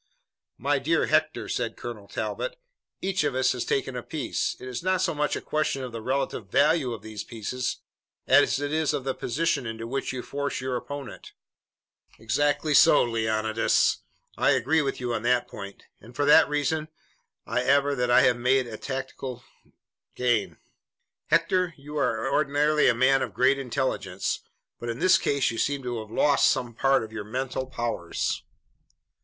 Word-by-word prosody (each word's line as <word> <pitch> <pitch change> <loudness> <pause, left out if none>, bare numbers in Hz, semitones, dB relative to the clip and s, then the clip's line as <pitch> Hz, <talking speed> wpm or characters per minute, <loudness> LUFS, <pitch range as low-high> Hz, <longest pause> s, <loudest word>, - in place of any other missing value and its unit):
"My - - +1
dear - - +1
Hector," - - +1
said - - -2
Colonel - - -7
Talbot, - - -4 0.5
"each 190 -2 0
of 145 -3 -1
us 130 0 +3
has 125 - -2
taken 135 -1 -1
a 125 - -3
piece. 150 +2 -2
It 130 - -9
is 125 -1 -4
not 185 +1 +1
so - - +1
much 150 0 0
a - - -4
question 150 -3 -1
of 125 - -6
the 115 -1 -6
relative 130 -5 -2
value 145 +2 +3
of 110 -3 -6
these 110 -1 -6
pieces 120 +3 -4 0.4
as - - +4
it 145 +1 -3
is 155 -2 +1
of 135 - -3
the 135 0 -1
position 140 -1 -1
into 115 0 -5
which 135 +4 -3
you 130 -1 -5
force 140 0 -3
your 130 0 -2
opponent." 140 +1 -7 0.8
"Exactly 145 +7 0
so, - - +7
Leonidas. 110 -1 +1 0.4
I - - +4
agree 135 +5 +2
with 140 -2 -2
you 120 -1 -2
on 115 - -2
that 125 +1 +2
point, 100 0 -9 0.2
and 115 +3 -15
for 145 - +1
that 150 +1 +6
reason 150 +1 0 0.6
I - - 0
aver 140 +1 +3
that 125 -2 0
I 120 - +6
have 125 -1 +4
made 125 +2 +2
a 115 -2 -7
tactical 130 -2 -5 0.7
gain." 120 -4 0 0.7
"Hector, 180 -3 +2
you 145 +2 -10
are 115 -6 0
ordinarily 150 +1 +2
a 120 - +4
man 130 +2 +4
of - - -4
great 135 +2 +3
intelligence, 125 -7 -2 0.4
but 120 - -5
in 115 - -3
this 185 +5 +4
case 140 -4 +1
you 115 - -5
seem 140 -1 0
to 120 -2 -3
have 110 -1 -8
lost 145 +5 +3
some 120 -1 -1
part 135 +2 +2
of 110 - -8
your 110 - -4
mental 130 +4 -3
powers." 120 -9 -2
130 Hz, 175 wpm, -26 LUFS, 120-145 Hz, 0.8 s, so